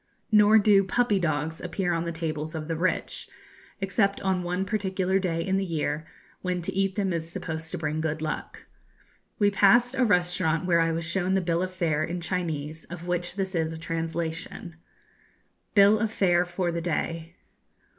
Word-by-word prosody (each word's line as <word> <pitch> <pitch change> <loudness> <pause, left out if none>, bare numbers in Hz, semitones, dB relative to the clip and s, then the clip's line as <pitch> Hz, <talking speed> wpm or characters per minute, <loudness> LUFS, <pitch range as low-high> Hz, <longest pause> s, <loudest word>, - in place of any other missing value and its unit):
Nor 210 0 +7
do 205 -2 +5
'puppy 210 +1 +1
dogs' 155 -1 -1
appear 180 0 -1
on 165 0 -1
the 170 - -2
tables 160 -1 -4
of 155 -1 -4
the 165 - -1
rich, 180 +3 -2 0.5
except 195 0 +1
on 190 -2 0
one 180 +2 -2
particular 190 -2 0
day 165 -3 -1
in 190 0 +1
the 195 - 0
year, 155 -3 -2 0.3
when 180 -1 -1
to - - -3
eat 195 0 0
them 195 -3 0
is 165 -1 -3
supposed 160 -1 -5
to - - -4
bring 155 0 -2
good 160 0 -2
luck. 155 0 -5 0.7
We 205 -1 +3
passed 235 +5 +5
a 265 -1 +2
restaurant 180 -5 +2
where 170 -2 +3
I 165 0 +2
was 165 0 -2
shown 185 +2 0
the - - +3
bill 170 -1 0
of 185 0 -2
fare 160 -4 0
in 175 +3 -3
Chinese 160 -3 -3
of 175 0 -8
which 175 0 -2
this 190 -1 -2
is 160 -2 0
a - - -6
translation: 165 +1 -4 1.0
BILL 205 +1 +6
OF 220 -1 0
FARE 180 -4 +3
FOR 175 0 -2
THE 170 0 -3
DAY. 165 0 -3
175 Hz, 185 wpm, -26 LUFS, 165-190 Hz, 1.0 s, Nor